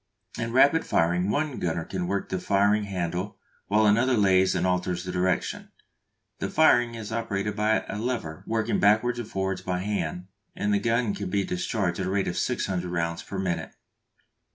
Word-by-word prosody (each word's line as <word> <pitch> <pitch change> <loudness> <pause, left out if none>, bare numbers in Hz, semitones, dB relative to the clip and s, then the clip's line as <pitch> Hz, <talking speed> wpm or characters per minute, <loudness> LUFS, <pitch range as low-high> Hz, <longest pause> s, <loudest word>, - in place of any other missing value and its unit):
In 115 0 -2
rapid 140 +6 +5
firing 90 +3 +1
one 145 +1 -1
gunner 80 -1 -2
can 90 -2 -3
work 100 +1 -2
the 95 - -2
firing 100 +2 +2
handle 90 0 -3 0.3
while 105 +2 +3
another 115 +4 +3
lays 95 -2 +4
and 90 0 0
alters 90 -1 0
the 90 - -4
direction. 90 0 -1 0.7
The - - -2
firing 120 -6 +4
is 110 -1 -7
operated 105 -2 -2
by 110 +1 +1
a 105 - -4
lever 110 -10 -3
working 110 -1 0
backwards 110 +4 +3
and 120 - -5
forwards 95 -1 -2
by 90 -1 -2
hand, 90 -3 -3 0.3
and 105 0 0
the 100 - +3
gun 115 0 +1
can 100 -2 -4
be 100 +1 +1
discharged 90 0 -2
at 95 - -1
the - - -2
rate 100 -1 0
of 90 - -2
600 90 -2 -1
rounds 85 -1 -2
per 100 - -7
minute. 95 -3 -3
100 Hz, 180 wpm, -26 LUFS, 90-110 Hz, 0.7 s, rapid